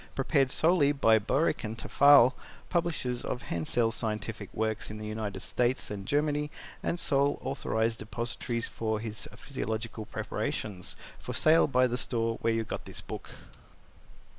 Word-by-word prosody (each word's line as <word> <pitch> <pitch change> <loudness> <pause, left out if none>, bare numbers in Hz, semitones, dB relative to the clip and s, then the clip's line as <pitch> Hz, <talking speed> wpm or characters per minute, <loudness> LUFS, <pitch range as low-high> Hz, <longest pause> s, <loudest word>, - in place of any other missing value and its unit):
Prepared 135 0 +2
solely 155 0 +4
by 115 -6 +5
Boericke 115 0 0
& - - -19
Tafel, 140 -2 +6 0.4
Publishers 160 -8 -1
of 125 - -3
Hensel's 115 +8 0
Scientific 110 -2 -3
Works 110 0 -2
in 110 - -6
the 105 - -6
United 105 -1 -4
States 125 -1 0
and 100 -1 -6
Germany 150 0 +1 0.3
and 170 - -1
sole 140 -1 +2
authorized 115 -4 -1
depositaries 115 +1 -3
for 110 -1 -2
his 110 0 -4
Physiological 110 -4 -4
preparations. 95 -5 -3 0.2
For - - -6
Sale 160 +1 +5
by 130 -2 +4
the 125 0 -1
Store 115 -2 -1
where 115 - +2
you 115 0 0
got - - -6
this - - -8
book. - - -7
115 Hz, 145 wpm, -30 LUFS, 110-140 Hz, 0.4 s, Tafel